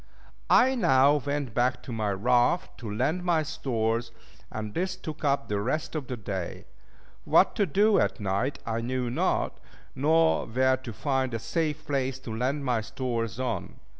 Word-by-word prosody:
I 260 +1 +6
now 145 - +4
went 140 -3 -3
back 125 +2 +1
to - - -8
my 110 -2 -1
raft 120 - +1
to 110 -4 -6
land 140 - 0
my 170 -3 +2
stores, 115 -6 -1 0.4
and 105 -1 -5
this 185 +1 -1
took 160 -5 -8
up 140 -1 +1
the 100 -1 -1
rest 145 +8 -2
of 150 -5 -4
the 125 - -4
day. 95 -4 -5 0.6
What - - +4
to 200 - +2
do 205 +7 +4
at - - 0
night 105 +7 -1
I 115 0 -2
knew 125 0 -2
not, - - 0 0.3
nor 160 +4 +3
where 130 +3 +2
to 130 -2 -8
find 130 +1 -1
a - - +1
safe 155 +4 -2
place 135 -3 -1
to 115 -4 -6
land 135 +5 -1
my 120 -3 +1
stores 115 -1 -3
on. 130 -2 -3
130 Hz, 170 wpm, -27 LUFS, 115-150 Hz, 0.6 s, I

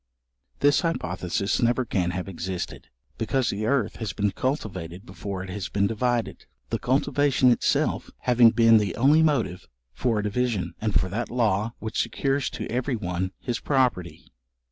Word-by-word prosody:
This 145 0 +4
hypothesis 95 - -1
never 120 +1 +2
can 90 -5 0
have 90 +1 -4
existed, 95 -6 -5 0.3
because 120 +3 0
the 105 +2 -2
earth 125 -5 0
has 110 -5 -4
been 100 +1 0
cultivated 95 - -4
before 95 +1 -6
it 95 - -7
has 100 -1 -4
been 100 0 +1
divided; 120 +2 -1 0.2
the - - 0
cultivation 135 0 +2
itself 120 - +1
having 120 -2 +6
been 115 -1 +5
the 100 -4 -2
only 145 +6 +5
motive 140 - 0 0.3
for 115 - 0
a 105 - 0
division, 110 -1 -1
and 105 -7 +2
for 95 - -1
that 110 +5 -3
law 110 -2 0
which 110 0 -2
secures 135 0 -1
to - - -5
every 125 +2 -1
one 90 -3 -3
his 120 -3 -3
property. 115 - -1
110 Hz, 160 wpm, -25 LUFS, 95-125 Hz, 0.3 s, having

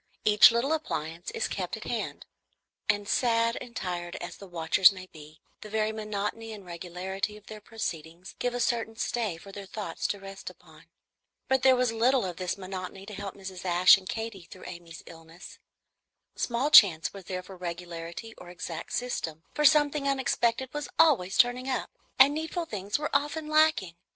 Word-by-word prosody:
Each 210 0 +8
little 235 +6 +1
appliance 170 - -4
is 460 - -2
kept - - -4
at - - -9
hand; - - -4 0.6
and 205 0 +1
sad 230 0 +2
and 245 -1 -10
tired 175 -5 -4
as 175 - -7
the 200 - -11
watchers 175 +2 +5
may 185 -1 -9
be, 155 -3 -15 0.2
the 210 - -9
very 215 0 0
monotony 215 +1 -4
and 205 -3 -10
regularity 180 +4 -5
of 210 - -18
their 215 -1 -10
proceedings 175 -5 -6
give 245 0 -1
a - - -2
certain 230 -2 0
stay 220 -5 -2
for 195 +4 -12
their 195 0 -9
thoughts 210 +1 -4
to 205 - -3
rest 195 0 -8
upon. - - -18 0.6
But 265 -1 +2
there 265 -1 +6
was 250 -2 +1
little 245 +1 +3
of 180 -2 -5
this 185 0 -2
monotony 190 0 -7
to 210 - -9
help 200 0 -6
Mrs. 190 -2 -8
Ashe 180 0 +7
and 190 -1 -8
Katy 225 -5 -5
through 185 - -12
with - - -8
Amy's 170 -2 -11
illness. 165 +1 -13 0.8
Small 250 +5 -1
chance 180 - +7
was 195 -2 -10
there 185 0 -4
for 190 +1 -11
regularity 170 +3 -7
or 175 - -11
exact 175 -2 -7
system; 165 -10 -3
for 300 - 0
something 295 0 +4
unexpected 260 -2 0
was 295 -1 -4
always 265 - +4
turning 250 +2 +3
up, 255 - -2 0.3
and 270 +2 +7
needful 320 +3 -3
things 205 -6 -3
were 300 -1 -3
often 295 +2 0
lacking. 310 - +3
205 Hz, 180 wpm, -28 LUFS, 180-245 Hz, 0.8 s, Each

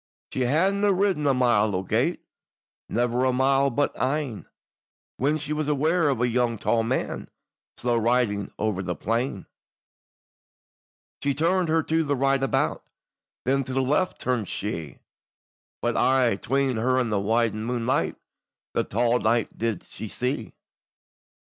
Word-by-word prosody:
She - - -2
hadna 190 +11 +2
ridden 190 -6 +1
a 140 - +4
mile 110 -5 +3
o' 90 - -1
gate, - - 0 0.7
Never 120 +2 +1
a 130 - +3
mile 135 +2 +3
but 145 +3 0
ane, 135 -4 -2 0.7
When 145 +4 +1
she 150 0 -3
was 150 -1 -2
aware 155 +2 +2
of 135 -5 0
a - - +1
tall 120 -1 +1
young 115 +2 +1
man, 130 - -2 0.5
Slow 120 -1 0
riding 115 -4 +1
o'er 105 -3 -1
the 90 -2 -3
plain, 115 - -2 1.8
She 140 -1 0
turned 170 +3 +1
her 160 0 +2
to 160 +1 +1
the 145 -1 0
right 135 +1 +2
about, 135 - 0 0.6
Then 135 +2 +2
to 130 - -6
the 135 - +2
left 150 +8 0
turn'd 125 -6 -1
she; 80 - -5 0.8
But - - +1
aye, 130 -6 +3
'tween 135 -1 0
her 130 +3 +2
and 125 -3 0
the 105 - +1
wan 110 +1 +1
moonlight, 120 +2 0 0.6
That - - -1
tall 120 +3 +2
knight 115 +1 +1
did 115 -4 -2
she 110 - -8
see. 125 +1 -3
125 Hz, 150 wpm, -25 LUFS, 115-140 Hz, 1.8 s, a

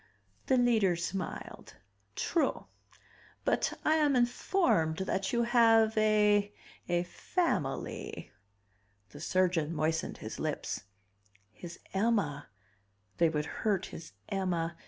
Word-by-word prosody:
The 260 - +4
Leader 225 -7 +3
smiled. 175 +1 -5 0.4
"True. 335 - 0 0.8
But - - +1
I 310 +1 +4
am 295 -3 +3
informed 240 - +2
that 190 0 -1
you 235 -1 +2
have 225 -2 +4
a 210 -1 +3 0.4
a 175 0 +2
family...." 180 - -3 0.8
The - - -11
surgeon 175 -4 +1
moistened 160 +1 -1
his - - -7
lips. - - -3 0.7
His 170 +5 -10 0.2
Emma 195 -9 0 0.7
they 170 -1 +4
would 150 -1 -1 0.2
hurt 200 -4 +1
his 165 - -9
Emma 175 -4 -1
195 Hz, 105 wpm, -31 LUFS, 170-230 Hz, 0.8 s, The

